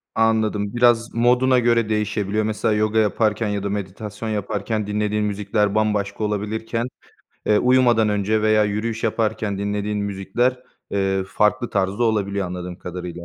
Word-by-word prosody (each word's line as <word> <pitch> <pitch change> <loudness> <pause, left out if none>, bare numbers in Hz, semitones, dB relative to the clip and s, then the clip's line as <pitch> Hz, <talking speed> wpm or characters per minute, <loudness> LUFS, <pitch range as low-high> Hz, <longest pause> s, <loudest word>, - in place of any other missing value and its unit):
Anladım. 110 -2 +1
Biraz 120 -1 +3
moduna 125 +2 +3
göre 115 -2 +2
değişebiliyor. 105 -1 0
Mesela, 110 0 0
yoga 110 +1 +1
yaparken 110 +1 +1
ya 100 -1 -2
da 100 - -2
meditasyon 105 +2 -5
yaparken 105 0 -2
dinlediğin 105 0 0
müzikler 105 0 0
bambaşka 105 -1 0
olabilirken, 110 +3 -2 0.6
eee, 105 - +4
uyumadan 125 -3 +4
önce 105 +1 +1
veya 110 0 +4
yürüyüş 110 +2 -2
yaparken 110 -2 -1
dinlediğin 105 +1 -2
müzikler, 100 +6 -1 0.3
eee, 95 -1 0
farklı 105 +3 +1
tarzda 100 +3 0
olabiliyor 100 -3 0
anladığım 90 0 -6
kadarıyla. 90 -1 -7
105 Hz, 135 wpm, -22 LUFS, 100-110 Hz, 0.6 s, eee